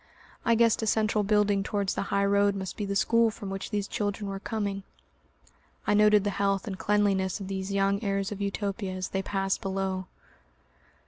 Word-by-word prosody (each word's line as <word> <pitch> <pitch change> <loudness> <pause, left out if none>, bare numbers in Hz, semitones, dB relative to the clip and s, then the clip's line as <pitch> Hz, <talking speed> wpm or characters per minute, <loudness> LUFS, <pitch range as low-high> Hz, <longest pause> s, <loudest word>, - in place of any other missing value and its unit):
I 230 - +3
guessed 230 -1 +3
a 220 - -1
central 215 0 +2
building 205 -1 +2
towards 200 -1 -1
the - - -2
high 200 0 +2
road 200 0 +3
must 190 -1 -5
be 210 - -3
the 200 0 -2
school 230 +3 +3
from 205 -2 -7
which 195 0 -5
these 205 -2 -2
children 205 0 -2
were 195 - -4
coming. 200 -2 -3 1.0
I - - +2
noted 210 -1 +5
the 205 - 0
health 195 0 0
and 200 -4 -4
cleanliness 200 -2 +1
of 195 - -6
these 190 0 -4
young 200 +1 +1
heirs 195 -1 -1
of 205 -1 -5
Utopia 200 -1 -2
as 185 0 -4
they 190 - -1
passed 195 0 -1
below. 190 -1 -2
200 Hz, 190 wpm, -28 LUFS, 195-210 Hz, 1.0 s, noted